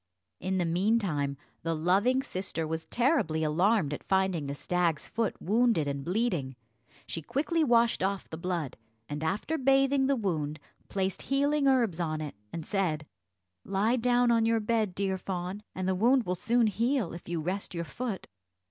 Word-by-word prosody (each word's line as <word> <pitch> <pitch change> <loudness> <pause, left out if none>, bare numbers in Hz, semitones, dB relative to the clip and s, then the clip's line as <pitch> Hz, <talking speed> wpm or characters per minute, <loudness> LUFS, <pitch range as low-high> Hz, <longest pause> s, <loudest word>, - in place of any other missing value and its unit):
In 190 +1 -1
the 180 - +1
meantime 170 -6 +1 0.2
the 165 0 -1
loving 200 +11 +2
sister 185 - -3
was 160 +1 -3
terribly 235 - +1
alarmed 170 +1 +2
at - - -6
finding 190 -6 +1
the 140 - -3
stag's 170 -1 0
foot 230 -2 -2
wounded 220 -5 +2
and 140 -1 -3
bleeding. 175 - -1 0.5
She 165 - -4
quickly 300 - 0
washed 235 -4 +3
off 195 +1 -1
the - - -7
blood, 170 -4 -3 0.3
and, 150 +1 -4
after 210 - -1
bathing 270 0 +3
the 275 - +3
wound, 160 - -2 0.3
placed 190 -1 -1
healing 285 +1 +1
herbs 235 -10 +3
on 155 -2 -1
it, 150 -2 -5 0.2
and 165 -2 -5
said, 170 -7 -1 0.6
"Lie 205 +5 +1
down 245 0 +3
on 230 -1 +4
your 225 0 +3
bed, 215 -3 0
dear 190 -1 -1
fawn, 185 +2 -4
and 185 0 -2
the 190 - +2
wound 240 +6 +3
will 180 - 0
soon 230 +6 +2
heal, 230 -1 0
if 170 - -9
you 170 -1 -1
rest 185 +4 -3
your 170 0 -2
foot." 230 +2 -4
190 Hz, 170 wpm, -29 LUFS, 165-235 Hz, 0.6 s, on